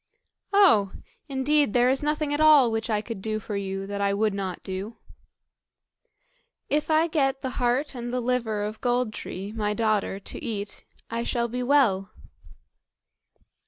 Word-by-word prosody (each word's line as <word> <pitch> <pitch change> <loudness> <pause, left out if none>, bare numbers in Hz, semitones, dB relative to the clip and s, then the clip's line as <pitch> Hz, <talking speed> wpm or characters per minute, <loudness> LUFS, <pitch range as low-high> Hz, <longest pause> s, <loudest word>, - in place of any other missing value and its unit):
"Oh! 285 - +5 0.4
indeed 280 -1 +2
there 245 0 +4
is 265 +1 +2
nothing 300 0 -1
at 290 - -1
all 295 -6 +6
which 225 +1 -2
I 210 -1 +1
could 225 -4 -6
do 215 +1 -2
for 210 0 -6
you 195 -1 -3
that 200 0 -4
I 200 0 +1
would 210 0 +1
not 190 -3 -4
do." 195 +4 -6 1.7
"If 300 +2 0
I 315 +1 +4
get 275 -5 0
the 260 - -2
heart 250 +5 +1
and 240 -1 -5
the 250 - -1
liver 235 -4 -1
of 215 +1 -5
Gold 245 -2 0
tree, 195 0 -6
my 210 -1 -2
daughter, 215 -3 0
to - - -7
eat, 205 -2 -5 0.3
I 230 0 -1
shall 235 0 -1
be 250 +2 -4
well." 245 -8 +3
230 Hz, 160 wpm, -26 LUFS, 205-270 Hz, 1.7 s, all